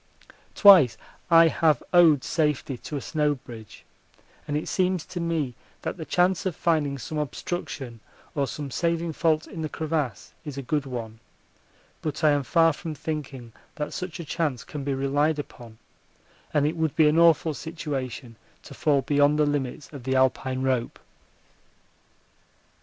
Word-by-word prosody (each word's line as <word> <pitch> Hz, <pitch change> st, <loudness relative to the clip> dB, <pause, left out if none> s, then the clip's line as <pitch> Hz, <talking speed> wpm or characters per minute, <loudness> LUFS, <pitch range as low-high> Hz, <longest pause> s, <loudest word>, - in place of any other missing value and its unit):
Twice 165 Hz, -, +7 dB, 0.3 s
I 165 Hz, -1 st, +7 dB
have 155 Hz, -4 st, +2 dB
owed 165 Hz, -6 st, +6 dB
safety 150 Hz, -4 st, 0 dB
to 145 Hz, +4 st, -6 dB
a -, -, -5 dB
snow 150 Hz, -2 st, +1 dB
bridge, 115 Hz, -4 st, -12 dB, 0.6 s
and 145 Hz, 0 st, -1 dB
it 155 Hz, -, -4 dB
seems 185 Hz, -3 st, 0 dB
to 180 Hz, -, -6 dB
me 165 Hz, -6 st, -1 dB, 0.3 s
that -, -, -3 dB
the 160 Hz, -, -6 dB
chance 180 Hz, +2 st, +1 dB
of 180 Hz, -, -3 dB
finding 150 Hz, -5 st, 0 dB
some 150 Hz, +4 st, -5 dB
obstruction 140 Hz, -5 st, -5 dB, 0.3 s
or 140 Hz, -2 st, 0 dB
some 145 Hz, -1 st, -6 dB
saving 170 Hz, +2 st, -1 dB
fault 155 Hz, 0 st, +1 dB
in 165 Hz, -, -8 dB
the 155 Hz, -, -3 dB
crevasse 155 Hz, -6 st, -3 dB
is 145 Hz, -4 st, -7 dB
a 140 Hz, -, -4 dB
good 145 Hz, +2 st, -1 dB
one, 115 Hz, -3 st, -6 dB, 0.8 s
but 155 Hz, 0 st, -4 dB
I 155 Hz, -, +6 dB
am 145 Hz, 0 st, +2 dB
far 165 Hz, +3 st, +3 dB
from 160 Hz, +1 st, -6 dB
thinking 135 Hz, -7 st, -6 dB, 0.2 s
that 150 Hz, -, -4 dB
such 180 Hz, -1 st, -5 dB
a 170 Hz, -, -6 dB
chance 145 Hz, -6 st, -2 dB
can 145 Hz, -2 st, -7 dB
be 140 Hz, 0 st, -1 dB
relied 145 Hz, +3 st, +1 dB
upon, 120 Hz, -6 st, -9 dB, 0.7 s
and 145 Hz, -1 st, +2 dB
it 155 Hz, +3 st, 0 dB
would 160 Hz, -2 st, -1 dB
be 155 Hz, -2 st, +5 dB
an 155 Hz, +2 st, +3 dB
awful 165 Hz, -1 st, +4 dB
situation 135 Hz, -7 st, -5 dB, 0.3 s
to -, -, -11 dB
fall 150 Hz, -4 st, +1 dB
beyond 145 Hz, +2 st, +3 dB
the 150 Hz, -, +3 dB
limits 145 Hz, 0 st, -3 dB
of 140 Hz, -4 st, -8 dB
the 130 Hz, +1 st, -1 dB
Alpine 130 Hz, 0 st, +1 dB
rope. 130 Hz, -3 st, -1 dB
150 Hz, 165 wpm, -25 LUFS, 135-160 Hz, 0.8 s, Twice